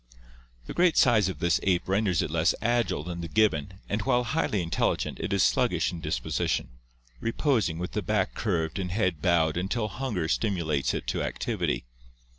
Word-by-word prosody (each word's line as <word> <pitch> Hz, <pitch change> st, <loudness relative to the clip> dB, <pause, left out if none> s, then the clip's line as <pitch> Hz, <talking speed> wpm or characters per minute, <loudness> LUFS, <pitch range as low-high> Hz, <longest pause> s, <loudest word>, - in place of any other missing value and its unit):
The -, -, -6 dB
great 175 Hz, -2 st, +3 dB
size 110 Hz, -6 st, +5 dB
of 90 Hz, -, -5 dB
this 85 Hz, +2 st, +2 dB
ape 90 Hz, -2 st, +1 dB
renders 95 Hz, -2 st, +1 dB
it -, -, -4 dB
less 80 Hz, 0 st, +2 dB
agile 120 Hz, -9 st, 0 dB
than 85 Hz, +1 st, -5 dB
the 85 Hz, -, -4 dB
gibbon 90 Hz, -3 st, +1 dB
and 105 Hz, +1 st, -1 dB
while 125 Hz, +1 st, +2 dB
highly 115 Hz, -, 0 dB
intelligent 85 Hz, -, -1 dB
it -, -, -3 dB
is 100 Hz, -1 st, +3 dB
sluggish -, -, +2 dB
in 85 Hz, -2 st, -7 dB
disposition, -, -, -1 dB, 0.5 s
reposing 115 Hz, -, 0 dB
with 90 Hz, +1 st, -4 dB
the 105 Hz, -, -2 dB
back 105 Hz, -2 st, 0 dB
curved 85 Hz, -5 st, -1 dB
and 90 Hz, -2 st, -3 dB
head 95 Hz, -6 st, 0 dB
bowed 85 Hz, -2 st, +2 dB
until 105 Hz, +4 st, -1 dB
hunger 105 Hz, -6 st, -2 dB
stimulates 85 Hz, -8 st, 0 dB
it -, -, -4 dB
to -, -, -1 dB
activity. -, -, -2 dB
95 Hz, 175 wpm, -27 LUFS, 85-110 Hz, 0.5 s, size